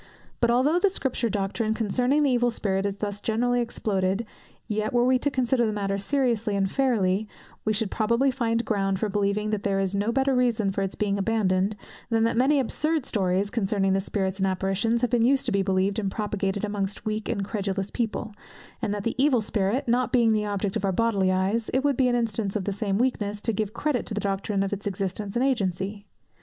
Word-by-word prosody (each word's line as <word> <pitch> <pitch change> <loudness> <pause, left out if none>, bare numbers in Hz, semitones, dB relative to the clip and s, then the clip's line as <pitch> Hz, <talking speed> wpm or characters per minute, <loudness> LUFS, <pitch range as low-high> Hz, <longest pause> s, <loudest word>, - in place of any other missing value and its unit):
But 235 - +3
although 265 +8 +3
the 400 - +3
Scripture 265 - -1
doctrine 215 +2 -1
concerning 250 +7 +1
the 280 - +3
Evil 245 -1 +3
Spirit 195 -3 -1
is 200 0 -4
thus 205 0 -4
generally 245 +2 +1
exploded, 200 -2 -1 0.4
yet 215 +1 -1
were 240 0 +3
we 255 0 +3
to 285 - +1
consider 255 -2 +1
the 220 - +1
matter 200 -1 -2
seriously 230 -3 0
and 195 -1 0
fairly, 215 -7 +1 0.4
we 215 - +2
should 215 -1 -1
probably 235 +5 +2
find 230 -2 0
ground 195 -3 0
for 215 - -1
believing 205 +1 0
that 210 -2 -1
there 195 -1 0
is 195 0 0
no 205 +3 0
better 270 +2 +2
reason 235 -5 +2
for 195 - -2
its 195 0 -2
being 200 -1 0
abandoned, 200 -2 +1 0.3
than 225 -1 +2
that 230 - +1
many 275 +4 +3
absurd 305 +3 0
stories, 195 -1 0
concerning 195 -3 +1
spirits 195 0 -2
and 195 - +2
apparitions, 195 +5 0
have 245 - 0
been 240 - +3
used 270 +3 +3
to - - +1
be 200 - +2
believed 195 +2 +1
and 200 -2 -1
propagated 200 -1 -2
amongst 205 -1 -3
weak 215 0 -2
and 200 - -1
credulous 195 -2 -3
people; 225 -2 -3 0.5
and 205 - -1
that 205 - -4
the 230 - -1
Evil 275 -4 +4
Spirit 215 +3 -1
not 245 +2 +1
being 235 -3 +4
the 210 -1 0
object 200 -1 -2
of - - -2
our 195 - +2
bodily 195 -2 +2
eyes, 195 +5 0
it 265 - +2
would 285 -1 +2
be 255 0 +3
an 245 - +2
instance 225 -4 -1
of 205 - -1
the 200 - -2
same 200 -1 -1
weakness 210 -4 0
to 225 +2 -1
give 210 0 -2
credit 255 +2 -1
to 210 - -3
the - - -1
doctrine 195 0 -1
of 195 - -2
its 205 0 -4
existence 195 +1 -3
and 245 +2 +2
agency. 200 -4 -1
210 Hz, 215 wpm, -26 LUFS, 195-240 Hz, 0.5 s, Evil